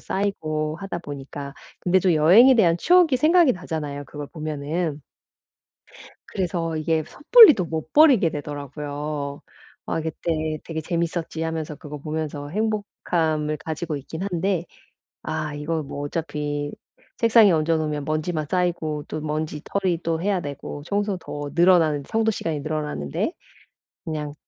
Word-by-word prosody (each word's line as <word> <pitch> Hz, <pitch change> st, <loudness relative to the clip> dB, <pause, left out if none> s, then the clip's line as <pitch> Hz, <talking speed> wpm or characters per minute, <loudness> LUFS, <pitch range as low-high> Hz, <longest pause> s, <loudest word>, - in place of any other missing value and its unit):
쌓이고 155 Hz, -6 st, -2 dB
하다 195 Hz, -3 st, -4 dB
보니까 140 Hz, -2 st, -8 dB, 0.3 s
근데 185 Hz, +1 st, +3 dB
좀 180 Hz, -1 st, +3 dB
여행에 190 Hz, +13 st, +7 dB
대한 175 Hz, -8 st, +4 dB
추억이 345 Hz, -, +4 dB
생각이 315 Hz, +1 st, +5 dB
나잖아요 150 Hz, -5 st, -5 dB
그걸 145 Hz, +1 st, -8 dB
보면은. 155 Hz, 0 st, -3 dB, 1.3 s
그래서 170 Hz, -3 st, -2 dB
이게 155 Hz, 0 st, 0 dB
섣불리 430 Hz, -, +8 dB
또 185 Hz, -, -1 dB
못 160 Hz, -1 st, -5 dB
버리게 270 Hz, -, +6 dB
되더라고요. 145 Hz, 0 st, -5 dB, 0.4 s
'아 -, -, -1 dB
그때 160 Hz, -1 st, -2 dB
되게 160 Hz, -1 st, -4 dB
재밌었지.' 165 Hz, -1 st, -2 dB
하면서 160 Hz, -2 st, -3 dB
그거 150 Hz, +1 st, -8 dB
보면서 150 Hz, -1 st, -4 dB
행복함을 165 Hz, -6 st, -1 dB
가지고 160 Hz, 0 st, -4 dB
있기는 160 Hz, +6 st, -6 dB
한데 175 Hz, 0 st, 0 dB, 0.6 s
'아 155 Hz, -1 st, -3 dB
이거 155 Hz, +2 st, -2 dB
뭐 140 Hz, 0 st, -6 dB
어차피 145 Hz, -2 st, -3 dB, 0.5 s
책상에 230 Hz, -3 st, +6 dB
얹어 160 Hz, 0 st, +2 dB
놓으면 150 Hz, -2 st, -2 dB
먼지만 155 Hz, 0 st, -1 dB
쌓이고 165 Hz, -5 st, -1 dB
또 155 Hz, -, -5 dB
먼지떨이 155 Hz, +4 st, -2 dB
또 165 Hz, -1 st, -1 dB
해야 195 Hz, -1 st, 0 dB
되고 145 Hz, -1 st, -7 dB
청소 200 Hz, +2 st, -1 dB
더 145 Hz, -4 st, -6 dB
늘어나는 170 Hz, -5 st, +4 dB
청소 225 Hz, +8 st, 0 dB
시간이 165 Hz, -7 st, -2 dB
늘어나는데 150 Hz, -, -3 dB, 0.7 s
그냥 150 Hz, -2 st, -4 dB
160 Hz, 315 characters per minute, -23 LUFS, 150-180 Hz, 1.3 s, 섣불리